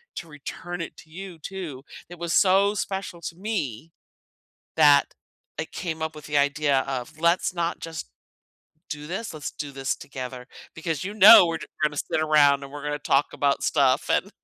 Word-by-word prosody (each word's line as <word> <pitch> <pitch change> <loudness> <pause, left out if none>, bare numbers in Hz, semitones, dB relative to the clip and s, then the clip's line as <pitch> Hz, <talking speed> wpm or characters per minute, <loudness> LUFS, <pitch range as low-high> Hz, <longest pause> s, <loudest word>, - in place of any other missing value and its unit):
to 170 - -6
return 170 +3 -7
it 165 - -7
to - - -15
you 185 0 -9
too," 160 -6 -7 0.3
it 175 -1 -11
was 170 -1 -2
so 200 +1 +4
special 190 -3 -4
to 170 - -6
me 165 - -4 0.9
that - - +5 0.4
I - - -1
came 160 -3 -5
up 160 0 -3
with 150 -1 -11
the 150 -1 +1
idea 145 -1 +2
of, 135 +3 -5
"Let's 170 +2 +2
not 170 -1 -2
just 165 -2 -7 0.8
do 150 -1 -6
this, 200 +6 -4
let's 155 - -5
do 145 -2 -6
this 135 0 -2
together," 125 -2 -8 0.3
because, 160 -1 -3
you 200 +2 -5
know, 215 -2 +10
we're 165 -1 -2
j - - -9 0.2
gonna 150 -1 +1
sit 150 - -1
around 145 -3 +4
and 135 - -11
we're 145 0 -8
gonna 150 0 -2
talk 140 0 +2
about 140 -1 0
stuff, 135 -1 +2
and 200 - +1
155 Hz, 185 wpm, -25 LUFS, 145-175 Hz, 0.9 s, know